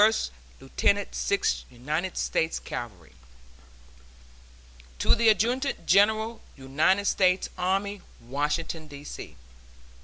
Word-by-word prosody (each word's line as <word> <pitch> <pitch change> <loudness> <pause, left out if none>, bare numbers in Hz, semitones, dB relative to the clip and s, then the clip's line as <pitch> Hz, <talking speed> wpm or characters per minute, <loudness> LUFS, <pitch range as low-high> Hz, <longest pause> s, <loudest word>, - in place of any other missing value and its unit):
(First 220 - +3 0.3
Lieutenant 200 +9 0
Sixth 200 -1 0
United 150 +9 -3
States 160 0 0
Cavalry.) 90 - -7 1.8
TO - - +3
THE 230 0 +4
ADJUTANT 240 +7 +1
GENERAL 220 +4 +3 0.2
UNITED 155 +9 +1
STATES 185 -2 +2
ARMY, 195 +2 -1 0.2
Washington, 150 +5 -2
D. 145 -1 -10
C. - - -8
180 Hz, 95 wpm, -27 LUFS, 145-205 Hz, 1.8 s, THE